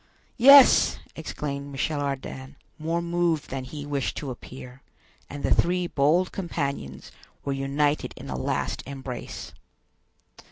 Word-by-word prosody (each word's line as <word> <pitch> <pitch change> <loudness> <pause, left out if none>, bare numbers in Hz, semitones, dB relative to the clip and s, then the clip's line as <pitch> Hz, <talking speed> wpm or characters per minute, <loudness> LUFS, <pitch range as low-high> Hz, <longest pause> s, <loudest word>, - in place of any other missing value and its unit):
"Yes," 275 +2 +8 0.2
exclaimed 140 -1 -5
Michel 145 +2 -1
Ardan, 135 0 -5 0.2
more 165 +2 -1
moved 170 -3 0
than 130 -1 -4
he 145 +2 -7
wished 140 -2 -2
to 140 -3 -4
appear; 125 +1 -10 0.5
and 145 0 -7
the - - +3
three 180 +1 +2
bold 170 +4 +2
companions 140 - -4 0.3
were 140 - 0
united 140 +2 0
in - - -9
a - - -4
last - - -2
embrace. 135 -3 -7
145 Hz, 125 wpm, -26 LUFS, 135-165 Hz, 0.5 s, Yes